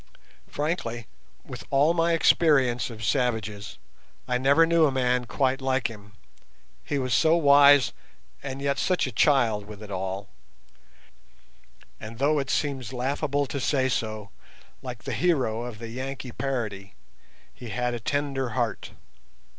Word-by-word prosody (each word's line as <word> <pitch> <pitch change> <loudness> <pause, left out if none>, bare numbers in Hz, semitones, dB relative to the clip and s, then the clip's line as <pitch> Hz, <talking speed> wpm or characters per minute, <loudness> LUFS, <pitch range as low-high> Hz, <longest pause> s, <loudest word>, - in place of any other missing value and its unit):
Frankly, 145 -7 -3 0.4
with - - -8
all 145 +4 +3
my 170 0 +2
experience 135 -8 +3
of 110 -2 -9
savages, 110 -5 -1 0.5
I 125 0 0
never 140 +5 +5
knew 165 -1 +4
a - - 0
man 125 -1 0
quite 135 +2 0
like 130 -2 0
him, 105 -1 -14 0.7
he 145 - -2
was 130 -3 -1
so 160 +10 +4
wise 140 -2 +6 0.5
and 135 0 -6
yet 140 0 0
such 185 -1 +1
a 130 - -4
child 115 -4 +2
with 105 0 -10
it 105 - -10
all; 95 +1 -4 1.7
and 110 +1 -9
though 145 +3 +2
it 135 -1 -4
seems 135 -5 -2
laughable 140 +3 -1
to 140 +1 -5
say 130 0 +1
so, 110 -4 -3 0.5
like 125 -4 -8
the - - -4
hero 130 -11 +1
of 120 -3 -7
the 115 +1 -8
Yankee 130 +1 -6
parody, 105 -8 -4 0.6
he 120 - -10
"had 125 +1 -2
a 120 - -4
tender 135 +1 -2
heart". 120 -4 -2
130 Hz, 145 wpm, -26 LUFS, 115-140 Hz, 1.7 s, wise